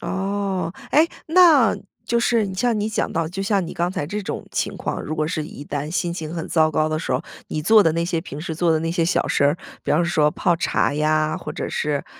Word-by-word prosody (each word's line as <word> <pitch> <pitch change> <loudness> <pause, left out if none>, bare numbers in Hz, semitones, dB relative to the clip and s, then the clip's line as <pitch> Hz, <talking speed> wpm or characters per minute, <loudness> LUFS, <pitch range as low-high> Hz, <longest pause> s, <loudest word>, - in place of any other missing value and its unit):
哦。 190 -1 -2 0.2
诶， 320 +3 +5 0.2
那 320 - +6 0.3
就 235 - +1
是 225 -5 +1
像 230 +1 +1
你 210 +1 -1
讲 220 - -1
到， 165 -1 -1
就 195 +3 -4
像 195 -2 +1
你 - - -7
刚 175 +1 0
才 145 - -3
这 210 +4 -4
种 - - -5
情 - - -2
况， - - -4
如 155 - -4
果 155 0 0
是 155 -1 -2
一 145 -1 -9
旦 145 +1 -4
心 175 0 -1
情 165 -1 -5
很 165 - -4
糟 155 -1 +3
糕 155 +1 +1
的 155 0 -1
时 - - -3
候， - - 0 0.3
你 155 - -2
做 220 +4 +6
的 160 - +3
那 170 +1 0
些 170 -2 -1
平 150 -3 -8
时 160 0 -4
做 170 0 +2
的 160 - +2
那 165 0 -1
些 170 -1 +1
小 180 - +1
事 - - +2
儿， 145 +4 +3 0.3
比 - - -3
方 170 +3 +3
说 155 -3 +2
泡 175 +1 +1
茶 145 - +1
呀， 155 +1 +1
或 - - -6
者 - - -4
是， 150 -2 -1
170 Hz, 265 characters per minute, -22 LUFS, 155-195 Hz, 0.3 s, 那